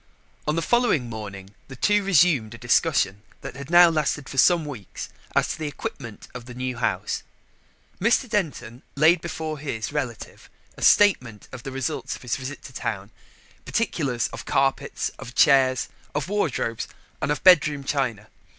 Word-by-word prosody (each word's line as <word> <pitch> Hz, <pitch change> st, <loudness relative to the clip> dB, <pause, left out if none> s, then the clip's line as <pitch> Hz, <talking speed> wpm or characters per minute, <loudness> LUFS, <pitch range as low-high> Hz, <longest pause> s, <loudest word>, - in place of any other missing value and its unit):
On 150 Hz, -, +1 dB
the 165 Hz, -, 0 dB
following 205 Hz, -, +2 dB
morning 100 Hz, -3 st, -8 dB, 0.2 s
the 130 Hz, -, -9 dB
two 205 Hz, +9 st, +2 dB
resumed 160 Hz, -, +3 dB
a -, -, -10 dB
discussion 120 Hz, -, +1 dB, 0.2 s
that -, -, -7 dB
had 140 Hz, 0 st, -8 dB
now 175 Hz, 0 st, +8 dB
lasted 155 Hz, -3 st, 0 dB
for 135 Hz, -, -2 dB
some 170 Hz, 0 st, +5 dB
weeks 125 Hz, -10 st, -7 dB, 0.3 s
as -, -, +2 dB
to -, -, -4 dB
the 155 Hz, -, -2 dB
equipment 120 Hz, -6 st, -7 dB
of 125 Hz, -1 st, -8 dB
the 125 Hz, 0 st, -10 dB
new 125 Hz, 0 st, -3 dB
house. 120 Hz, -, -1 dB, 0.8 s
Mr. 235 Hz, +5 st, +2 dB
Denton 145 Hz, -, -3 dB
laid 160 Hz, +4 st, +5 dB
before 160 Hz, -2 st, -5 dB
his 115 Hz, -4 st, -4 dB
relative 130 Hz, -6 st, -5 dB, 0.3 s
a -, -, -13 dB
statement 130 Hz, -, +4 dB
of 125 Hz, -, -8 dB
the 135 Hz, +1 st, -7 dB
results 130 Hz, 0 st, -3 dB
of -, -, -13 dB
his 125 Hz, -, -1 dB
visit 135 Hz, +2 st, -7 dB
to -, -, -11 dB
town -, -, -4 dB, 0.5 s
particulars 140 Hz, -, -1 dB
of -, -, -6 dB
carpets, 135 Hz, 0 st, 0 dB
of 125 Hz, -, -9 dB
chairs, 130 Hz, -2 st, +4 dB, 0.3 s
of 150 Hz, -1 st, -1 dB
wardrobes, 150 Hz, -, -1 dB, 0.3 s
and -, -, 0 dB
of 150 Hz, -, -2 dB
bedroom 150 Hz, -6 st, +5 dB
china. 125 Hz, -7 st, -1 dB
140 Hz, 165 wpm, -24 LUFS, 120-160 Hz, 0.8 s, now